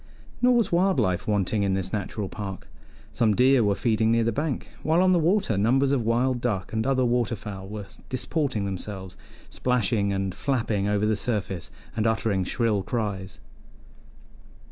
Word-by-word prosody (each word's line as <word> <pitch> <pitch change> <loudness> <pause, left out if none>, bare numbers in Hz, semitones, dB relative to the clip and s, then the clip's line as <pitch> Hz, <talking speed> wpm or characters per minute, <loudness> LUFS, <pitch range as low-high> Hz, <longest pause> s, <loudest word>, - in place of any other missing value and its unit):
Nor 250 0 +5
was 230 -5 +2
wild 180 -2 +3
life 90 -6 0
wanting 105 0 +1
in 100 -1 +1
this 95 0 -3
natural 105 0 -3
park; 95 -1 -7 0.5
some 110 -3 +2
deer 130 +1 +5
were 100 -1 +2
feeding 110 0 +1
near 115 0 +3
the 115 - +1
bank, 145 +3 -2
while 160 +2 +2
on 185 0 +4
the 180 - +4
water 165 - +2
numbers 135 +6 +3
of 140 -3 +2
wild 120 +2 +1
duck 105 -6 -2
and 110 +2 0
other 130 -2 +2
water 120 -1 +1
fowl 95 -2 -8
were 105 0 -6 0.2
disporting 130 -3 -1
themselves, 95 -1 -5 0.4
splashing 115 -5 +1
and 95 -1 -1
flapping 110 -5 -1
over 105 0 +1
the 110 0 +2
surface 100 -6 -2 0.3
and 110 +1 +1
uttering 110 -4 +1
shrill 110 +1 0
cries. 100 -3 -3
110 Hz, 165 wpm, -26 LUFS, 100-130 Hz, 0.5 s, Nor